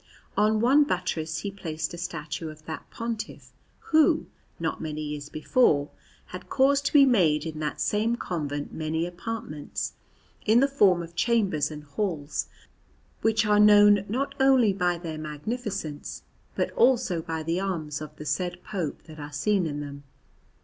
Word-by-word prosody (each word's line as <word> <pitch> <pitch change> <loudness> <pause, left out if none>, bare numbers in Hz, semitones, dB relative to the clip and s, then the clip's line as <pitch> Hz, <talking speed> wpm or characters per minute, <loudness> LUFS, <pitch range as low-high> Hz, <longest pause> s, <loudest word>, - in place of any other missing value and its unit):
On 215 +1 +3
one 270 +5 +6
buttress 165 - -2
he 200 - -4
placed 160 -5 -4
a - - -6
statue 165 -2 -5
of 155 0 -13
that 160 - -7
Pontiff, 230 -2 -6 0.4
who, 315 -1 +4 0.3
not - - -2
many 155 -1 -4
years 150 -1 -5
before, 155 - +2 0.4
had - - -8
caused 280 +1 +3
to - - -3
be 285 -2 +8
made 165 - +3
in 155 -1 -5
that 150 -1 -3
same 220 +3 +1
convent 145 -9 -4
many 160 +1 -1
apartments, 180 - -5 0.5
in 220 +2 +5
the 275 - +4
form 195 -11 +3
of 170 0 -11
chambers 195 -4 +1
and 150 -1 -8
halls, 150 -1 -3 0.7
which 225 0 +2
are 210 0 +4
known 205 -1 +7
not 260 +6 -1
only 260 -6 +5
by 180 -2 +1
their 165 -2 -6
magnificence 155 - -5 0.3
but - - 0
also 240 - +3
by 160 0 -4
the 165 +3 -1
arms 160 -6 -3
of 150 0 -8
the 150 - -9
said 180 +2 -2
Pope 180 -8 -4
that 155 -1 -12
are 145 0 -7
seen 185 +4 +1
in 145 -1 -4
them. 140 -1 -7
175 Hz, 160 wpm, -27 LUFS, 155-215 Hz, 0.7 s, be